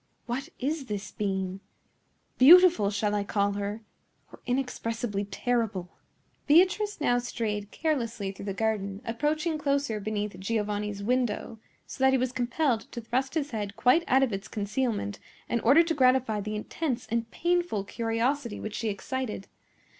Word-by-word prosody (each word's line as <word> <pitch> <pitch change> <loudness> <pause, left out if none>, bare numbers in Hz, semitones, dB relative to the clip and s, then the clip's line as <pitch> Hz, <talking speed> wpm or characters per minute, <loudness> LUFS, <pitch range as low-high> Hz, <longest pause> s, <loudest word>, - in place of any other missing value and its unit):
"What 265 +6 -3
is 280 +1 -2
this 205 -1 -4
being? 190 -2 -2 0.8
Beautiful 330 - +8
shall 205 0 0
I 205 -1 +1
call 200 0 +1
her, 205 +2 -3 0.5
or - - -13
inexpressibly 230 -5 -2
terrible?" 205 -3 -1 0.6
Beatrice 375 +6 +4
now 245 -5 +2
strayed 210 -4 -3
carelessly 235 -11 -2
through 195 - -9
the 195 - -2
garden, 205 -1 -1
approaching 305 +7 -1
closer 280 -6 0
beneath 210 -2 -3
Giovanni's 210 0 -2
window, 235 -1 -1 0.3
so 265 - -5
that 265 0 +5
he - - +5
was 255 0 0
compelled 245 0 0
to - - -4
thrust 260 +5 -2
his 295 -2 -1
head 205 -3 -4
quite 255 +11 +4
out 265 +1 +4
of 245 -5 0
its 195 0 -4
concealment 210 -1 -2 0.3
in 235 - 0
order 280 +9 +6
to 330 0 -1
gratify 255 -6 +3
the 215 +1 -4
intense 250 +3 -3
and 230 0 -1
painful 345 - 0
curiosity 230 +3 -1
which 215 - -5
she 225 0 -2
excited. 215 0 -4
230 Hz, 150 wpm, -28 LUFS, 205-265 Hz, 0.8 s, Beautiful